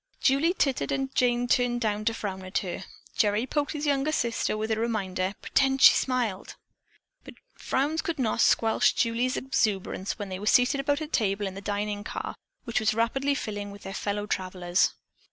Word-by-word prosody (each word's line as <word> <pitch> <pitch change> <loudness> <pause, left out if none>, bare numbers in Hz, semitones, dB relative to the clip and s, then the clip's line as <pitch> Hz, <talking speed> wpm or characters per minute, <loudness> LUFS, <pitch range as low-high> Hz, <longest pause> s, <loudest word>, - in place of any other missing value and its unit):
Julie 295 +7 +3
tittered 275 -7 0
and 270 -1 -2
Jane 245 -1 +2
turned 240 0 +1 0.3
to 230 - +3
frown 190 -3 -4
at 185 +2 -3
her. 180 +1 -5 0.3
Gerry 210 +2 +2
poked 290 +2 -1
his 300 0 -3
young 285 +1 +1
sister 235 -6 0
with 220 +1 -2
the 220 - 0
reminder, 195 -4 -1
"Pretend 270 -1 +2
she - - +9
smiled." 240 -7 -1 0.7
But - - -12 0.2
frowns 295 +5 -1
could 335 - -3
not 230 -3 0
squelch 225 -1 +3
Julie's 240 +2 +1
exuberance 200 -7 -1
when 205 -3 -5
they 185 0 -5
were 210 - -5
seated 250 +4 +4
about 285 +2 0
a 310 - -3
table 205 -7 0
in 190 - -4
the 195 - -8
dining 205 0 -3
car, - - -5 0.3
which 235 - -1
was 220 -1 +1
rapidly 270 +5 +1
filling 205 -5 -4
with 200 0 -11
their 195 - -6
fellow 205 0 -2
travelers. 185 -2 0
230 Hz, 180 wpm, -27 LUFS, 205-265 Hz, 0.7 s, she